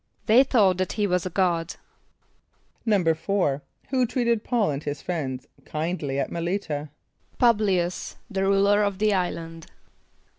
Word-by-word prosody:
=They 230 +5 +6
thought 200 -9 +3
that 185 - -1
he 210 - 0
was 180 -2 0
a - - -4
god.= 175 -2 0 1.1
=4.= 175 -5 +1 0.3
Who 255 -2 +2
treated 235 -3 0
P[a:]ul 230 -9 +1
and 140 +1 -4
his 145 -1 -4
friends 135 -7 -4 0.2
kindly 155 -3 -3
at 140 - -1
M[)e]l´[)i] 170 +3 -1
t[.a]? 150 -6 -5 0.5
=P[)u]b´l[)i] 215 -5 +3
[)u]s, 175 -1 -6
the 195 -4 -3
ruler 200 +1 +3
of 200 -2 0
the 210 +1 +2
island. 165 -3 -3
185 Hz, 145 wpm, -25 LUFS, 165-210 Hz, 1.1 s, =They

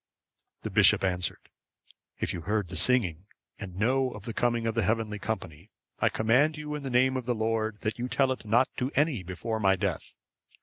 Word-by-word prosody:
The - - -4
bishop - - +5
answered: 90 -1 -2 0.7
"If - - -2
you 85 - -5
heard 105 0 -1
the - - -5
singing, 100 -8 +3 0.3
and 95 -3 -8
know 130 +5 +2
of 105 - -10
the 115 - -4
coming 120 -1 0
of 115 - 0
the 115 - 0
heavenly 110 -1 -1
company, 95 -5 -5 0.3
I - - +3
command 135 +8 +2
you, 150 0 -5
in 150 - -4
the 135 - -5
Name 130 +1 +3
of 125 - -5
the 120 -1 0
Lord, 110 -1 -1
that 110 +2 -3
you 125 - -2
tell 130 +1 +1
it 130 - -4
not 115 +4 +3
to 125 +2 -1
any 150 - +2
before 95 +5 -4
my 95 -2 +3
death. - - -3
115 Hz, 205 wpm, -28 LUFS, 105-125 Hz, 0.7 s, bishop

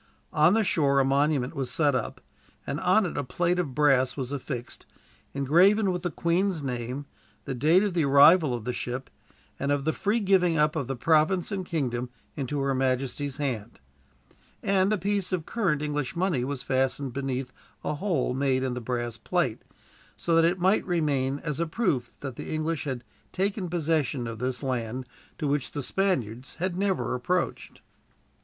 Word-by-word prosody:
On 155 +6 +5
the 225 - +3
shore 140 -7 +2
a 135 - +3
monument 140 -1 +1
was 135 -3 -2
set 145 +2 +2
up, 125 -3 -3 0.4
and 140 - -3
on 190 +5 +3
it 170 - -3
a - - -1
plate 175 +7 0
of 145 -8 -2
brass 135 -4 +3
was 130 -1 -4
affixed, 130 -3 -6 0.5
engraven 185 +9 +4
with 180 -1 -2
the 175 - -1
Queen's 170 +1 0
name, 125 +2 -4 0.4
the - - -3
date 155 - +4
of 205 -3 -1
the 170 -2 +2
arrival 140 +1 +6
of 120 - -6
the 125 - -1
ship, 125 +2 -4 0.5
and 140 +1 0
of 145 -1 0
the 160 - +1
free 210 +3 0
giving 185 -5 +3
up 150 +1 +2
of 140 -6 -2
the 135 - -2
province 160 - +2
and 190 -3 -3
kingdom 125 -6 -2 0.3
into 140 +1 -2
her 135 0 +1
majesty's 130 +1 -1
hand; 120 -7 -3 0.8
and 195 0 +2
a 215 - +2
piece 200 -1 -1
of 175 -4 -1
current 170 -10 0
English 150 -4 -2
money 170 -8 +1
was 135 0 -4
fastened 130 0 0
beneath 135 -1 -3 0.3
a - - -1
hole 150 -6 0
made 130 -1 +1
in 130 -2 -1
the 125 - -4
brass 120 -1 -3
plate, - - -1 0.6
so 170 - -1
that 165 0 +5
it 175 +2 +2
might 190 +3 +3
remain 145 -6 0
as 150 -2 -3
a 170 - 0
proof 155 - -1
that 135 -4 -6
the - - -6
English 155 0 -2
had 130 -3 -3 0.3
taken 195 -1 -1
possession 155 -6 0
of 115 -1 -6
this 125 +2 -2
land, 125 -1 -2 0.3
to 150 - -2
which 140 -1 -1
the 145 - -3
Spaniards 130 - -1
had 180 +2 -2
never 195 -5 0
approached. 175 +9 -2
145 Hz, 180 wpm, -27 LUFS, 130-175 Hz, 0.8 s, arrival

